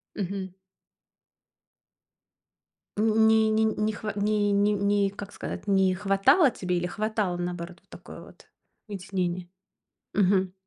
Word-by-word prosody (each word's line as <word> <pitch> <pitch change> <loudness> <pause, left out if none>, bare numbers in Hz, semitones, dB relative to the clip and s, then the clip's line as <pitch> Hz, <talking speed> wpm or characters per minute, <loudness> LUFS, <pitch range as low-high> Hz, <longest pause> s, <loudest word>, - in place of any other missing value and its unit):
Мгм. 190 -1 -4 2.5
Не 220 0 +4
не 220 0 +2
не 215 0 0
хва 215 0 -5
не 205 0 +1
не 205 +1 +3
не 200 0 +1
как 200 0 -9
сказать, - - -7
не 190 -1 +3
хватало 205 - +4
тебе 180 -5 -3
или 175 +1 -1
хватало, 210 -2 -2
наоборот, 175 0 -5
вот - - -39
такое - - -11
вот - - -17 0.4
вытеснение? 180 -3 -3 0.7
Мгм. 190 -2 +2
200 Hz, 120 wpm, -26 LUFS, 185-215 Hz, 2.5 s, Не